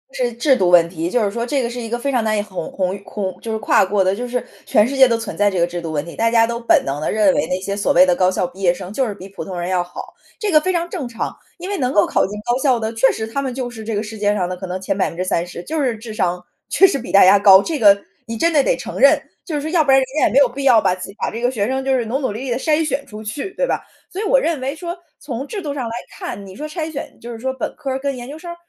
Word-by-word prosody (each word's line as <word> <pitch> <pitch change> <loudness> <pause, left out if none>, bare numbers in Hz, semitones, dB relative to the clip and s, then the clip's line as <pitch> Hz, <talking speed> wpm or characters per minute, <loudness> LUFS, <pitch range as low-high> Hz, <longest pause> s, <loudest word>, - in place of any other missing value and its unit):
是 245 -1 0
制 260 +3 +3
度 185 -5 +2
问 170 -2 +6
题， 170 0 -3
就 235 +2 +1
是 200 - 0
说 235 +1 -3
这 270 +1 0
个 235 - -2
是 245 +1 -6
一 230 - -5
个 240 - -1
非 280 +2 -1
常 240 -3 +1
难 215 -1 +1
以 - - +1
鸿 185 -5 -6
鸿 185 0 -1
越 200 - -10
鸿 195 -2 -5
就 225 - -5
是 220 - -1
跨 205 - +3
过 195 0 +1
的 190 +1 +1
就 245 +4 -4
是 250 0 -3 0.2
全 210 +2 +4
世 275 - -4
界 265 -1 +8
都 230 -1 +1
存 225 -2 -6
在 205 0 +3
这 185 - -1
个 170 - +4
制 175 0 -5
度 165 -1 -5
问 145 -2 -1
题。 170 - -9
大 230 0 +2
家 230 -1 +5
都 235 0 -3
本 235 - +3
能 140 +2 -3
地 - - -1
认 210 -3 +3
为 160 - 0
那 180 +1 -1
些 200 +1 -3
所 200 - +1
谓 180 +2 +7
的 180 - +2
高 185 0 +3
校 185 - 0
毕 185 +2 -14
业 175 -2 +4
生 185 +1 -8
就 260 -1 0
是 210 - -4
比 185 - -10
普 195 - -7
通 185 -2 -5
人 175 +1 -3
要 180 -1 +1
好， 175 - -10 0.3
这 420 -2 -1
个 305 - +6
非 370 - 0
常 345 0 -1
正 325 -9 -4
常， 230 -1 -4 0.2
因 360 +2 -7
为 405 - -2
能 255 -5 0
够 205 - +5
考 - - +2
进 210 +2 -7
高 240 +1 +1
校 255 -5 +3
的 220 +1 -3
确 225 +4 +4
实 220 - -4
他 275 +5 -3
们 265 -2 -3
就 250 -1 -4
是 225 -2 -9
这 220 -1 -3
个 205 - -1
世 220 0 -8
界 205 0 +2
上 180 -3 0
的 185 - -3
可 190 - -7
能， 185 +1 -4
前 195 0 -1
30% 175 -1 -2
就 310 - -2
是 240 -4 0
智 220 0 -8
商， 180 -3 -1 0.3
确 385 - +5
实 280 -7 -1
比 245 - -7
大 200 - +7
家 195 +2 +7
高， 195 -1 +8
这 315 -4 -3
个 200 -2 +5 0.2
你 230 0 -4
真 335 +5 +2
的 290 -3 +4
得 - - +1
承 - - -6
认， - - +6 0.3
就 315 - -4
是 290 - -1
说 310 - -4
要 330 -4 +4
不 280 - -4
然 270 - +7
人 260 - 0
家 - - +4
也 - - -2
没 - - +3
有 280 - +6
必 275 +3 -6
要 245 -5 +7
把 190 -2 +2
自 185 - -8
己 200 - -12
把 - - -1
这 230 - -6
个 245 - +2
学 210 -4 -1
生 265 +1 -1
就 265 -1 +2
是 235 - -1
努 255 +5 -1
努 260 -6 -1
力 245 +4 -5
地 240 - 0
筛 310 +1 +1
选 280 0 -1
出 215 0 -9
去， 275 - -5
对 - - +1
吧？ - - -1 0.3
所 390 - -4
以 - - -2
我 - - +4
认 335 - -1
为 270 +3 -3
说， 345 +2 -5 0.2
从 270 0 -5
制 410 -3 -5
度 290 -2 -3
上 260 -4 -3
来 230 - -5 0.3
看， 200 - -6
你 190 - -11
说 300 +2 -5
筛 315 0 -4
选 285 - -7
就 240 +1 -8
是 230 - -8
说 260 +3 -2
本 260 - -5
科 270 -3 -3
跟 280 0 -2
研 245 +2 -8
究 300 - -7
生， 345 +1 -8
230 Hz, 360 characters per minute, -19 LUFS, 195-270 Hz, 0.3 s, 界